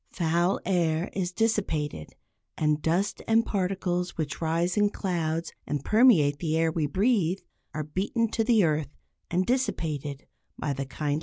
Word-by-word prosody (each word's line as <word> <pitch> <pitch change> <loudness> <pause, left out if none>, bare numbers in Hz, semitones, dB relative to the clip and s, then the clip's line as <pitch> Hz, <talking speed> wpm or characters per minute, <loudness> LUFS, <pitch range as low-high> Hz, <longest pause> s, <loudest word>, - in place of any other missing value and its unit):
Foul 170 +2 +1
air 170 -2 +1
is 185 -2 -2
dissipated, 175 - -1 0.4
and 150 -1 +1
dust 175 +6 0
and 225 +1 +4
particles 180 -2 -1
which 155 -1 -3
rise 170 +2 0
in 205 0 +3
clouds 165 -5 -2
and 145 -2 -3
permeate 190 - +5
the 160 -2 0
air 165 0 +2
we 155 -2 0
breathe, 190 - +1 0.3
are 155 - -1
beaten 195 +9 -1
to 225 - 0
the 225 -3 +4
earth 155 -3 +1 0.4
and 180 +2 +1
dissipated 155 - -2 0.3
by 145 - -2
the 135 0 -4
kindly 145 +1 -2
rain. - - -2
170 Hz, 155 wpm, -27 LUFS, 155-195 Hz, 0.4 s, permeate